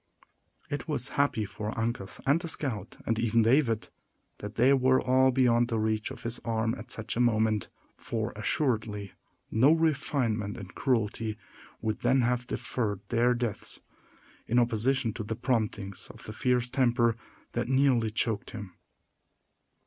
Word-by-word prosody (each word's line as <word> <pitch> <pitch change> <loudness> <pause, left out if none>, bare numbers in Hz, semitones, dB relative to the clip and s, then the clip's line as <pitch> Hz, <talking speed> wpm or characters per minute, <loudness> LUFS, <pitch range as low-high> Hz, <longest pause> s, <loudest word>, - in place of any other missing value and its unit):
It 145 - -3
was 135 -5 -2
happy 140 -6 +1
for 105 +2 -5
Uncas 115 -4 -3
and 140 +4 +4
the 175 - -5
scout, 120 - -4
and 115 0 0
even 115 0 +3
David, 115 -2 +2 0.5
that 105 +1 -7
they 125 +4 +5
were 130 -1 +4
all 130 +1 +4
beyond 120 -2 +3
the 115 -2 -1
reach 110 0 0
of - - -9
his 115 +1 -4
arm 115 0 -1
at 110 - -10
such 110 -1 -3
a - - -2
moment; 110 -3 +2 0.3
for, - - -3
assuredly, 110 -7 -1 0.4
no 130 +7 +5
refinement 130 -9 +1
in 95 - -8
cruelty 110 -2 -1 0.4
would 110 -1 -1
then 135 0 +3
have 125 0 0
deferred 105 -6 -2
their 120 +1 +3
deaths, 120 -4 -4 0.7
in 120 - +1
opposition 120 +1 +2
to 110 - -5
the 110 +2 -3
promptings 110 -6 -2
of - - -12
the 110 - -7
fierce 125 +1 +1
temper 120 -3 +3 0.4
that - - -2
nearly 130 -4 +3
choked 110 -1 -1
him. 105 -6 -8
115 Hz, 150 wpm, -29 LUFS, 110-130 Hz, 0.7 s, they